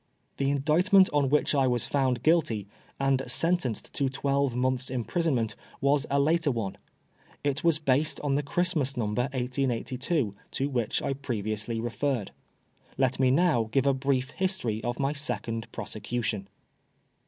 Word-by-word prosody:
The 135 - 0
Lidictment 180 +8 +4
on 145 -2 +2
which 150 +2 +2
I 135 -2 +3
was 120 -2 +1
found 130 -4 0
guilty, 155 - +2 0.3
and 135 -1 +2
sentenced 165 -10 0
to 140 -2 0
twelve 140 -1 0
months' 130 0 0
imprisonment, 125 -2 0 0.2
was 140 +1 +2
a 140 - +2
later 160 +2 +2
one. 115 -7 -3 0.6
It 145 0 -1
was 165 -2 +4
based 150 0 +1
on 145 -2 0
the 145 - +2
Christmas 150 -3 0
Number, 110 +1 0
1882, 130 - -1 0.2
to 135 +2 -1
which 120 -5 -1
I - - 0
previously 115 -4 -2
referred. 120 -1 -2 0.7
Let 130 -1 +1
me 130 -1 +4
now 135 -6 +3
give 135 +3 +2
a 140 - +4
brief 135 0 0
history 185 - -2
of 120 0 -2
my 140 +1 0
second 115 -6 -4
prosecution. 110 -2 -3
135 Hz, 145 wpm, -28 LUFS, 120-145 Hz, 0.7 s, Lidictment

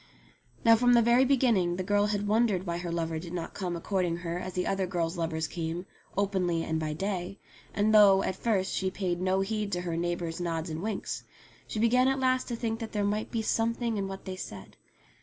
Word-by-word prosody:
Now 230 0 +8
from 245 +2 +4
the 235 -1 +6
very 240 +3 +5
beginning 235 -10 +3
the 185 - -3
girl 205 +2 +2
had 205 -1 -1
wondered 210 -3 +2
why 170 -1 -2
her 175 -1 -4
lover 165 -1 -2
did 170 +1 -8
not 170 -2 -4
come 180 -3 -3
a - - -4
courting 180 -2 -1
her 170 +1 -2
as 185 0 -6
other 190 +1 0
girls' 170 -1 -1
lovers 160 -2 -2
came, 170 +2 -4 0.3
openly 185 -4 +1
and 160 0 -1
by 155 -1 -2
day, 190 +2 -3 0.3
and 210 +1 +1
though, 200 -2 +7
at 185 - -1
first, 195 -3 0
she 190 - 0
paid 180 -2 -2
no 190 +1 +2
heed 210 0 -2
to 175 - -1
her 170 -2 -3
neighbours' 175 0 -2
nods 165 -1 -2
and 155 +1 -4
winks, 210 0 -3 0.5
she - - -5
began 245 +4 +4
at 270 0 +1
last 255 0 +1
to 240 - -3
think 225 -1 -2
there 220 -3 -2
might 210 +1 -1
be 225 -2 -2
something 230 +1 0
in 195 -1 -1
what 195 0 -8
they 190 - -4
said. 100 - -8
190 Hz, 215 wpm, -29 LUFS, 175-220 Hz, 0.5 s, Now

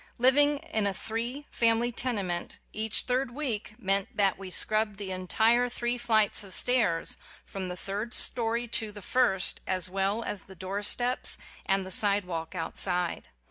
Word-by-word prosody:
Living 285 +4 +4 0.2
in 215 -2 +1
a 195 - -2
three 235 +7 -4
family 230 +1 +2
tene 235 -4 -1
ment, 175 -1 -3 0.2
each 215 0 0
third 255 +1 -1
week 240 -6 -4
meant 195 0 0
that 195 -2 +2
we 195 -1 -9
scrubbed 215 +2 +2
the 195 -2 -5
entire 220 +7 +2
three 240 0 -2
flights 220 -4 +1
of 195 -2 -5
stairs 220 -10 +2 0.3
from 190 -1 -6
the 180 0 -6
third 205 +5 -5
story 235 0 +2
to 220 -1 -1
the 205 -1 -10
first, 225 -7 +1
as 185 -1 +5
well 195 +4 -1
as 205 - -4
the 190 - -13
doorsteps 205 +7 0 0.3
and 195 -1 +1
the 190 - -7
side 205 0 +5
walk 165 0 -6
outside. 180 +1 -2
210 Hz, 165 wpm, -28 LUFS, 190-240 Hz, 0.3 s, as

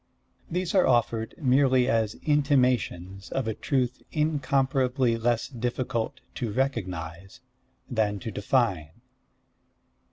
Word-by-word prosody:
These 180 +1 -2
are 190 - +4
offered 115 -2 +1
merely 130 -2 +3
as 110 -3 +1
intimations 125 - +1
of 135 -4 -1
a 110 - 0
truth 130 +1 -1
incomparably 135 -4 +1
less 115 0 0
difficult 125 0 -3
to 120 -4 -3
recognize 95 -8 -3 0.5
than 110 -5 0
to 110 - -5
define. 105 - 0
125 Hz, 100 wpm, -27 LUFS, 110-135 Hz, 0.5 s, are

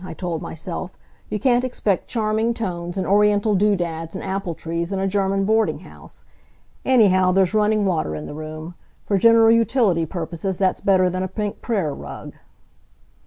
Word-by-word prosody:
I 185 - -7
told 175 -3 -4
myself. 175 +3 -6 0.3
"You 210 - -2
can't 245 +3 +2
expect 215 -7 -1
charming 220 0 0
tones, 175 -4 -4
and 190 - -1
Oriental 210 +1 +3
do 205 +1 +3
dads 165 -2 -4
and - - -5
apple 190 -3 -3
trees 170 +3 -4
in 195 - -1
a 195 0 0
German 195 0 0
boarding 220 +1 +1
house. - - -12 0.6
Anyhow 190 -8 +4
there's 190 0 +2
running 215 -1 +2
water 160 - -1
in 75 0 -6
the - - -7
room. 155 +2 -7 0.3
For 200 -2 +1
general 230 +1 +6
utility 225 -8 +2
purposes 170 +2 -4
that's 190 -1 0
better 185 -2 +3
than 185 +1 -2
a 185 - -1
pink 205 +2 -4
prayer 195 - -1
rug." - - -9
195 Hz, 170 wpm, -21 LUFS, 175-215 Hz, 0.6 s, general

